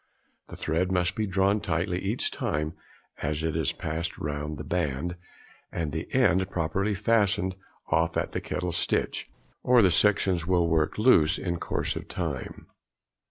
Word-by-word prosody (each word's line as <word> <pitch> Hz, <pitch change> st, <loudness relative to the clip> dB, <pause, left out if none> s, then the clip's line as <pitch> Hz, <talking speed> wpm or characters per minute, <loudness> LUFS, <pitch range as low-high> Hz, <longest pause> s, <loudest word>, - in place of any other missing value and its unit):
The -, -, -9 dB
thread 85 Hz, +4 st, 0 dB
must 90 Hz, -1 st, +1 dB
be 110 Hz, -2 st, -1 dB
drawn 95 Hz, +2 st, +2 dB
tightly 90 Hz, +2 st, -1 dB
each 100 Hz, +6 st, -1 dB
time 75 Hz, +2 st, -2 dB, 0.5 s
it 75 Hz, +1 st, -1 dB
is 80 Hz, -2 st, 0 dB
passed 80 Hz, +2 st, -4 dB
round 75 Hz, +1 st, -4 dB
the -, -, -6 dB
band, 85 Hz, 0 st, -1 dB, 0.6 s
and 80 Hz, -3 st, -2 dB
at -, -, -8 dB
the 80 Hz, +2 st, -5 dB
end 95 Hz, -8 st, +3 dB
properly 95 Hz, +4 st, 0 dB
fastened 100 Hz, -3 st, +2 dB, 0.4 s
off 80 Hz, +1 st, +2 dB
at -, -, -1 dB
the -, -, -3 dB
kettle 90 Hz, -1 st, -3 dB
stitch, 85 Hz, -, -1 dB, 0.3 s
or 125 Hz, -2 st, +5 dB
the 95 Hz, -, +5 dB
sections 95 Hz, -3 st, +2 dB
will 90 Hz, -2 st, +3 dB
work 80 Hz, -2 st, +1 dB
loose 95 Hz, -8 st, +5 dB
in 85 Hz, -2 st, -2 dB
course -, -, -1 dB
of -, -, -6 dB
time. -, -, -4 dB
85 Hz, 160 wpm, -27 LUFS, 80-95 Hz, 0.6 s, or